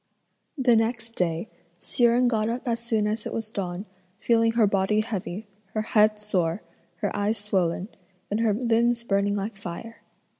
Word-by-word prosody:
The 250 -3 +4
next 225 0 0
day, 170 +2 0 0.3
Hsi 240 - +1
Jen 240 +1 +4
got 220 -2 +1
up 245 +3 -3
as 230 -1 0
soon 230 -3 0
as 210 +1 -2
it - - -6
was 225 -1 -4
dawn, 185 -1 -4 0.3
feeling 230 0 +3
her 230 -2 +4
body 200 +1 +2
heavy, 215 -2 -4 0.3
her 215 - +1
head 215 -1 +4
sore, 185 -4 -1 0.4
her - - -1
eyes 205 +2 0
swollen, 190 -3 0 0.4
and 210 - +1
her 225 -1 +3
limbs 235 0 +2
burning 200 -2 +1
like 205 +2 -2
fire. 195 +4 -8
215 Hz, 165 wpm, -26 LUFS, 200-230 Hz, 0.4 s, The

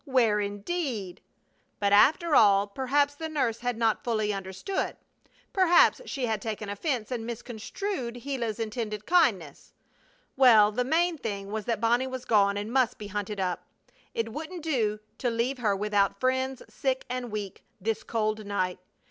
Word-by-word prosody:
Where 240 -7 +3
indeed? 205 - -3 0.6
But, 200 -1 +2
after 315 - +5
all, 200 -1 +6
perhaps 270 +7 +1
the 320 +2 -6
nurse 255 -7 0
had 245 -1 -2
not 225 -2 +2
understood 210 - -2
fully. - - 0 0.6
Perhaps 370 +4 +5
she 270 -4 -2
had 220 -3 -1
taken 215 -1 -4
offense 235 +2 -2
and 240 -3 -2
misconstrued 240 - -5
Gila's 240 -6 -3
intended 215 -2 -4
kindness! 210 - +1 0.6
Well, 225 -6 +7
the 250 +4 0
main 330 +4 +1
thing 200 -4 -4
was 215 -1 -3
that 230 -3 -1
Bonnie 240 +3 +2
was 260 -1 -6
gone 200 -2 +3
and 210 +3 -4
must 260 -4 +2
be 205 -1 -8
hunted 205 0 -4
up. 180 -1 -1 0.5
It 225 -1 -2
wouldn't 320 +3 -6
do 225 -9 0 0.2
to 245 - 0
leave 240 +3 -1
her 210 -4 +1
without 205 0 +1
friends, 260 0 0
sick 265 -1 -2
and 250 -1 -4
weak, 205 -3 -5 0.2
this 220 +2 -1
cold 215 -1 -1
night. 185 -3 -2
230 Hz, 155 wpm, -28 LUFS, 205-260 Hz, 0.6 s, Well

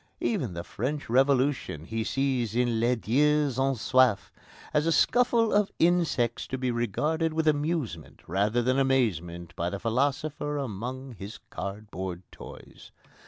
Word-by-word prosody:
Even 130 - -1
the 85 - -4
French 135 +6 -4
Revolution 130 - +2
he 110 +3 -2
sees 125 -3 -1
in 120 -2 +1
Les 120 +2 +2
Dieux 145 +4 +2
Ont 135 -1 +1
Soif 130 -3 +3 0.4
as 150 +1 +2
a - - +3
scuffle 235 +3 +3
of 205 -1 +2
insects 165 -9 +1
to 130 - -3
be 130 -1 -1
regarded 150 - 0
with 160 0 0
amusement 145 - -1
rather 105 +7 +1
than 130 +2 +2
amazement 90 - 0
by 85 0 -1
the 100 - -4
philosopher 145 +6 -1
among 130 +1 -5
his 100 +1 -8
cardboard 95 -3 -5
toys. - - -12
130 Hz, 140 wpm, -28 LUFS, 110-145 Hz, 0.4 s, Soif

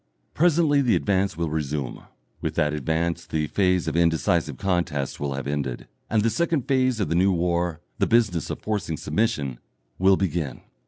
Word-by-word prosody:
Presently 160 -3 +3
the 125 -4 +3
advance 95 -3 0
will 85 -2 -1
resume. 75 -4 -3 0.4
With - - -3
that 75 0 +1
advance 85 +3 -1
the 80 -1 -1
phase 90 0 +1
of 80 - -1
indecisive 85 -3 +1
contest 85 -7 -1
will 70 -1 -2
have 70 - -4
ended, 70 -3 -3 0.2
and 110 -1 +2
the 115 - +2
second 165 -4 0
phase 130 -3 +2
of 100 - 0
the - - -1
new 95 +3 +4
war, 85 -1 0 0.2
the - - +2
business 110 -9 +2
of - - -4
forcing 105 -7 -2
submission, 75 - -1 0.4
will 95 +1 +5
begin. 85 -8 -2
85 Hz, 170 wpm, -24 LUFS, 75-105 Hz, 0.4 s, will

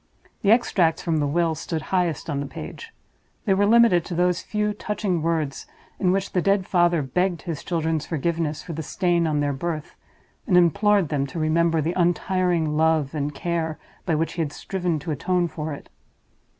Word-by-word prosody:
The 200 - +1
extracts 185 -8 +3
from 165 -2 0
the 145 -1 +1
will 165 +2 +1
stood 160 +1 -4
highest 175 -5 0
on 145 -4 -2
the 140 - -3
page; 455 - -8 0.5
they 200 - +3
were 200 +1 +3
limited 230 -6 +5
to 175 - -5
those 180 +1 +2
few 210 0 -1
touching 205 -4 -2
words 160 -4 -1 0.3
in 180 -2 +2
which 195 +1 -1
the 180 - +1
dead 195 +1 +2
father 175 -4 +2
begged 175 +6 -1
his 165 -5 -5
children's 160 -3 -1
forgiveness 160 -1 -2
for 170 - -6
the 160 - -4
stain 175 +1 +1
on 150 -2 +1
their 145 -1 0
birth, 155 +2 -4 0.5
and 180 -5 +4
implored 200 0 +3
them 140 -2 0
to 135 - -8
remember 165 +1 +2
the 165 +4 -1
untiring 175 -2 +1
love 155 -2 +2
and 145 -1 -3
care 165 -2 -2 0.3
by 165 - +2
which 160 +1 -1
he 170 - -2
had 150 -3 -2
striven 180 -4 -2
to 155 +2 -5
atone 175 +4 0
for 155 -1 -5
it. 145 - -8
170 Hz, 190 wpm, -24 LUFS, 155-180 Hz, 0.5 s, limited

